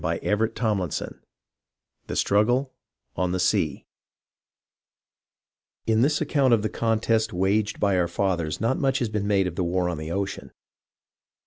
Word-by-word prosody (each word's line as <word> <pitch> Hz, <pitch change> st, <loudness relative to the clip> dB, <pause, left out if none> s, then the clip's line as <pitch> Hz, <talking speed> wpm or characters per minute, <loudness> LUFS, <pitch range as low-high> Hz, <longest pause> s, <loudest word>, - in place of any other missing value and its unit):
CHAPTER 105 Hz, +2 st, 0 dB
XXXVI 105 Hz, -8 st, -2 dB, 0.9 s
THE -, -, -4 dB
STRUGGLE 120 Hz, +7 st, +2 dB, 0.4 s
ON 90 Hz, 0 st, -1 dB
THE 95 Hz, -, -1 dB
SEA 90 Hz, -, 0 dB, 2.0 s
In 110 Hz, 0 st, +2 dB
this 145 Hz, +4 st, +2 dB
account 140 Hz, -5 st, +3 dB
of 105 Hz, -, -3 dB
the 110 Hz, -, 0 dB
contest 115 Hz, -1 st, 0 dB
waged 100 Hz, +4 st, 0 dB
by 100 Hz, -2 st, +2 dB
our 85 Hz, -, +2 dB
fathers 85 Hz, -4 st, -1 dB
not 115 Hz, +5 st, 0 dB
much 135 Hz, -1 st, +1 dB
has 120 Hz, -, -1 dB
been 105 Hz, -1 st, -2 dB
made 100 Hz, -2 st, +2 dB
of 90 Hz, -, -3 dB
the 90 Hz, -, +1 dB
war 90 Hz, +1 st, 0 dB
on 85 Hz, -3 st, -4 dB
the 80 Hz, +1 st, -6 dB
ocean. 100 Hz, +2 st, -4 dB
105 Hz, 145 wpm, -25 LUFS, 90-115 Hz, 2.0 s, account